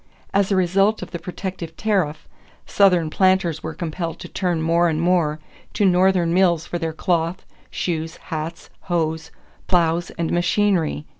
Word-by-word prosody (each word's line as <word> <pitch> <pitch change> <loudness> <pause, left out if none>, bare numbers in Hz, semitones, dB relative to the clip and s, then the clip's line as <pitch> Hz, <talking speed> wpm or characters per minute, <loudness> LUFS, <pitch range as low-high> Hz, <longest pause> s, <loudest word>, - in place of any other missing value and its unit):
As 200 0 +2
a - - +3
result 195 +3 +2
of - - -9
the 170 - -5
protective 180 -3 -6
tariff, 190 -9 -1 0.4
Southern 180 -6 +3
planters 185 -4 +2
were 160 0 -6
compelled 165 0 -4
to - - -7
turn 180 -3 -1
more 170 +2 +2
and 155 -1 -1
more 165 -3 +1 0.3
to 205 - +1
Northern 180 -2 +3
mills 175 -3 +3
for 175 - -4
their 165 -1 -2
cloth, 165 +2 -1 0.2
shoes, 165 -2 -3 0.2
hats, 160 +2 -5
hoes, 160 -3 -2 0.4
plows, 170 -1 +1
and 170 -2 -1
machinery. 175 -4 +1
175 Hz, 150 wpm, -22 LUFS, 160-185 Hz, 0.4 s, a